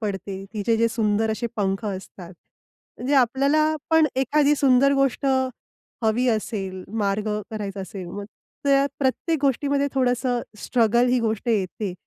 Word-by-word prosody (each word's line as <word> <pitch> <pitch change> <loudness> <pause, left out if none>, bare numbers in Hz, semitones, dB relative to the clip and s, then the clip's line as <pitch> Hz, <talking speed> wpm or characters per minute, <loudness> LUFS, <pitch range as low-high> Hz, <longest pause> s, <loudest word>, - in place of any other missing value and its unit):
पडते, 195 -2 -4
तिचे 225 +1 0
जे 230 +1 +3
सुंदर 220 -1 0
असे 225 +2 -2
पंख 195 +1 -1
असतात, 190 -3 -7 0.7
म्हणजे 265 +4 0
आपल्याला 275 +4 +3 0.3
पण, 320 -1 +5
एखादी 285 +3 +3
सुंदर 275 0 +4
गोष्ट 275 +1 +1 0.8
हवी 225 +3 +2
असेल, 200 -4 -2 0.2
मार्ग 205 +1 0 0.2
करायचा 205 -3 -5
असेल, 190 0 -7
मग 200 +4 -6 0.4
त्या 275 0 +4
प्रत्येक 285 +4 0
गोष्टीमध्ये 280 +1 +1
थोडंसं 250 -1 +1 0.2
स्ट्रगल 235 +1 +2
ही 250 - +3
गोष्ट 225 0 -2
येते. 200 -2 -1
230 Hz, 135 wpm, -23 LUFS, 205-270 Hz, 0.8 s, पण